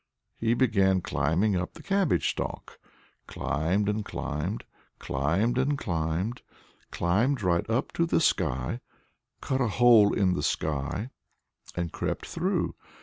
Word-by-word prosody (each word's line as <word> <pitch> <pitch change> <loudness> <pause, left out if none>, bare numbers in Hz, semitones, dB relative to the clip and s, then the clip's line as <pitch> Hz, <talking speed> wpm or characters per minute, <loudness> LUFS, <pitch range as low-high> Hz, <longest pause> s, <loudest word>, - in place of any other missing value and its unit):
He 115 +1 +2
began 100 -7 +3
climbing 85 +9 +1
up 90 0 -2
the - - -12
cabbage 195 -5 +1
stalk, - - -4 0.5
climbed 90 +7 -1
and 105 +1 0
climbed, 80 +4 -4 0.3
climbed 85 - 0
and 140 +2 +1
climbed, 85 +4 -2 0.5
climbed 110 +8 +1
right 85 +2 +1
up 115 +3 0
to 170 - +1
the - - +2
sky, 65 - 0 0.6
cut 130 0 -1
a 125 - +2
hole 110 -1 +6
in 95 -3 +2
the 90 - -1
sky, 80 - -2 0.6
and 85 -2 -2
crept - - -3
through. - - -1
100 Hz, 130 wpm, -28 LUFS, 80-120 Hz, 0.6 s, hole